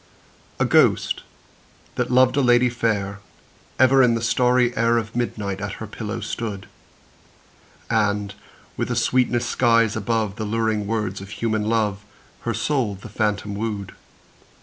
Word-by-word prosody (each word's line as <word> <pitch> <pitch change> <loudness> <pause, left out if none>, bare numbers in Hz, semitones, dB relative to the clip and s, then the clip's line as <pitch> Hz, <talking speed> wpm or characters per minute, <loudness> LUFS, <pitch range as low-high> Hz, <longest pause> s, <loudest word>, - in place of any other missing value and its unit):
A - - +3
ghost, - - +3 0.7
that - - -2
loved 130 +1 +4
a 140 - +3
lady 125 -1 +4
fair, 100 -4 -1 0.6
Ever 130 +1 +5
in 120 -2 +4
the 115 - -2
starry 125 +1 +2
air 115 +1 +2
Of 115 0 -4
midnight 105 -5 -3
at 105 - -4
her 110 - -7
pillow 110 +1 -5
stood; 105 -1 -5 1.2
And, 105 -2 0 0.4
with - - -2
a - - -1
sweetness 125 -1 +1
skies 115 -2 +2
above 110 -1 -1
The 110 - -3
luring 110 -1 -1
words 105 -3 -2
of 95 - -9
human 110 -1 -1
love, 105 -3 0 0.4
Her - - -3
soul 130 -9 0
the 95 +3 -11
phantom 105 -1 -1
wooed. 105 -2 -4
110 Hz, 145 wpm, -22 LUFS, 105-120 Hz, 1.2 s, Ever